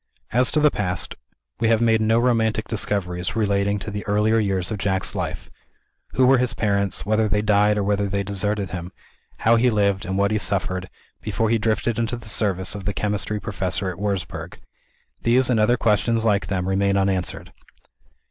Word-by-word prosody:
As 125 +2 +3
to 155 - +1
the 150 -1 +4
past, 90 -3 -2 0.5
we 115 - +1
have 115 -1 +3
made 115 -1 +3
no 110 +1 +3
romantic 110 -3 +1
discoveries, 100 -3 -1
relating 100 -2 +1
to 105 +2 -6
the 105 0 -5
earlier 105 +2 +2
years 95 -3 -1
of 105 - -3
Jack's 95 -1 +1
life. - - -5 0.6
Who 130 - +3
were 130 0 +5
his 125 -2 0
parents; 100 -3 0
whether 110 +1 +2
they 105 0 0
died 105 0 +3
or 105 - 0
whether 100 0 0
they 100 +1 -1
deserted 100 -1 -2
him; 90 0 -6 0.5
how 115 +1 +3
he 125 +2 +3
lived, 100 -3 +1
and 95 +1 -2
what 100 +1 +2
he 110 - +1
suffered, 95 -2 -1 0.3
before 110 -1 -1
he 115 - +2
drifted 110 +1 0
into 115 +1 -1
the 110 -2 -10
service 95 -3 0
of 100 -2 -7
the 100 - -1
chemistry 105 0 -2
professor 95 -2 -1
at 90 - -10
Wurzburg 100 -2 -4 0.6
these, 125 +2 +3
and 115 - +2
other 120 +3 +3
questions 115 +1 +1
like 105 -3 +1
them, 95 -2 -2
remain 100 +1 +1
unanswered. 95 -2 -2
105 Hz, 185 wpm, -22 LUFS, 100-110 Hz, 0.6 s, were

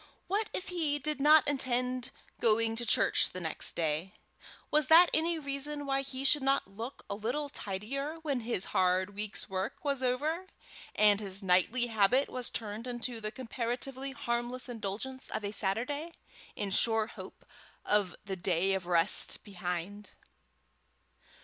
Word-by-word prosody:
What 420 +3 -1
if 370 - -4
he 320 -5 0
did 295 0 -2
not 300 +1 +6
intend 255 -2 +1 0.3
going 225 0 +3
to 235 +1 -3
church - - +3
the 185 - -7
next 160 -3 -2
day? 165 +5 -1 0.6
Was 300 -2 +3
that 335 +2 +8
any 330 +1 +2
reason 290 0 -3
why 275 0 +1
he 270 -1 -5
should 295 +1 +5
not 270 -4 +1
look 225 +7 -8
a - - -3
little 245 +8 -2
tidier 270 +8 -4
when 280 -5 0
his 230 -5 -1
hard 185 +1 +2
week's 210 +1 -3
work 190 +7 -4
was 280 -2 0
over, 300 +9 -1 0.5
and 210 -1 +6
his 195 -1 -3
nightly 190 +7 +3
habit 230 +4 +3
was 250 -1 -1
turned 220 +2 -5
into 240 -1 -3
the 215 0 -2
comparatively 260 +2 -4
harmless 250 -2 -2
indulgence 235 +3 -5
of 210 - -3
a 200 - -3
Saturday, 250 - -2 0.4
in 200 -2 -3
sure 225 +2 +3
hope - - -11 0.4
of 205 -4 +2
the 195 -2 -3
day 185 +1 +1
of 190 -2 -2
rest 170 -2 +2
behind. 190 +1 -5
240 Hz, 150 wpm, -31 LUFS, 200-275 Hz, 0.6 s, that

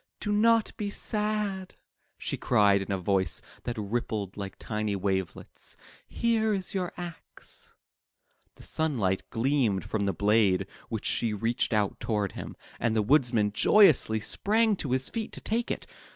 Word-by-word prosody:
"Do 210 - -2
not 225 +1 +3
be 210 -2 -2
sad,'' 210 -3 -2 0.4
she - - -3
cried 100 -1 +3
in 95 - -5
a 100 - +1
voice 95 -3 +1 0.3
that 120 -1 -3
rippled 105 -2 -3
like 100 -1 -6
tiny 105 -2 -2
wavelets, 95 -2 -3 0.3
"here 220 -2 +1
is 190 -1 -3
your 185 -3 -1
axe." 175 -2 -9 0.8
The - - -13
sunlight 115 -13 0
gleamed 120 -5 +1
from 105 -2 -1
the - - +2
blade 100 -1 +3 0.2
w^hich 110 -2 -3
she 115 -3 0
reached 115 +3 0
out 105 -3 0
toward 105 -3 -1
him, - - -7 0.2
and 115 -1 +1
the 110 - +2
Woodman 120 -4 +3
joyously 135 - +5
sprang 215 - +1
to 145 - -4
his 130 +1 +1
feet 225 -2 -3
to - - -7
take 230 +3 -1
it. - - -3
115 Hz, 150 wpm, -28 LUFS, -, 0.8 s, joyously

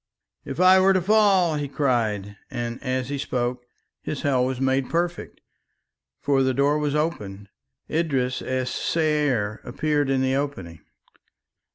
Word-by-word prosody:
"If 135 - -6
I 185 +1 +7
were 190 +1 +5
to 185 - +2
fall!" 195 -5 +3
he 145 -1 -3
cried, 110 -8 -1
and 120 0 -5
as 130 -1 -2
he 140 -1 -3
spoke 125 -2 -3 0.3
his 150 - -5
hell 130 -3 +2
was 130 -1 -3
made 135 0 0
perfect, 175 +1 -3 0.8
for 140 -2 +1
the 130 -1 +1
door 145 +3 +2
was 150 -1 -1
opened. 105 -11 -3 0.4
Idris 135 -6 -1
es 130 -1 -2
Saier 145 -10 0
appeared 145 +2 -1
in 135 -1 +1
the 130 0 +1
opening. 115 - -4
135 Hz, 145 wpm, -24 LUFS, 125-150 Hz, 0.8 s, I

